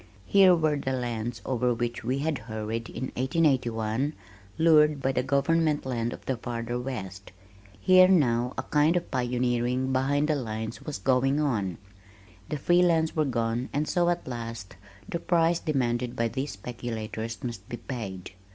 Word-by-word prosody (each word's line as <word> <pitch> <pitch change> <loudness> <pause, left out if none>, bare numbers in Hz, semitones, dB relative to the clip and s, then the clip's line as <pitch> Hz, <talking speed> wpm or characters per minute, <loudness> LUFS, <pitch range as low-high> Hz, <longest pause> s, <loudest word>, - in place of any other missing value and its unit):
Here 190 -2 +6
were 155 -3 +1
the 130 -1 -2
lands 120 -2 -3
over 125 -1 +1
which 120 0 -3
we 130 +4 0
had 150 -1 -1
hurried 110 0 -5
in 130 +2 -5
1881, 130 -3 +1 0.4
lured 155 -2 +5
by 135 0 0
the 125 - 0
"Government 145 +3 +1
Land" 120 -2 -1
of - - -9
the 130 - -1
farther 120 0 -4
west. 100 -7 -6 0.5
Here, 185 - +7
now, 125 -9 +2
a - - -2
kind 155 +4 +3
of 175 - -4
pioneering 125 0 0
behind 140 +3 +1
the 155 - +3
lines 110 -3 -4
was 150 - -5
going 135 +2 +2
on. 105 - 0 0.7
The 150 - -2
free 175 +5 +3
lands 165 -2 +2
were 155 -1 +2
gone 120 -1 -1
and 150 +2 0
so, 175 -1 +2
at 175 0 -2
last, 115 -6 -6 0.3
the 170 - -3
price 170 -1 +2
demanded 125 -5 -1
by 115 -2 0
these 135 +4 -3
speculators 110 0 -5
must 115 -5 -6
be 120 - -4
paid. 110 -8 -6
125 Hz, 160 wpm, -27 LUFS, 115-150 Hz, 0.7 s, Here